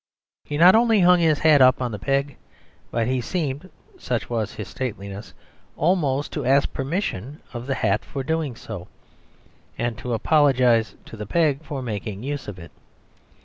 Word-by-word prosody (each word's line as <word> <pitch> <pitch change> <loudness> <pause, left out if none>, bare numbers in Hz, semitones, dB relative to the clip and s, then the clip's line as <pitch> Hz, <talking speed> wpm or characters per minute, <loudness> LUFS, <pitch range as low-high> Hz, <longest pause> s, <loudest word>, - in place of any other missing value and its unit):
He 145 - -4
not 175 +4 +8
only 225 -2 +4
hung 180 0 +6
his 160 -3 +3
hat 150 -3 +5
up 130 0 +6
on 125 -2 -2
the 105 - -5
peg, 135 +5 -1 0.5
but 115 -1 0
he 130 +1 0
seemed 150 +4 -3 0.3
(such 120 -1 -3
was 110 -2 -2
his - - -6
stateliness) 105 -6 -6 0.4
almost 150 -5 +1
to - - -3
ask 135 +3 +2
permission 140 - -3
of 120 +1 -6
the 135 - 0
hat 105 -3 0
for 135 -2 -5
doing 160 -3 -2
so, 100 -6 -8 0.9
and 120 -1 -2
to 120 +2 -3
apologise 125 -4 +3
to - - -10
the 105 -2 -7
peg 150 0 +1
for 140 -3 -5
making 105 -2 -5
use 145 +1 -4
of 100 -3 -7
it. 85 -1 -11
130 Hz, 170 wpm, -23 LUFS, 115-150 Hz, 0.9 s, not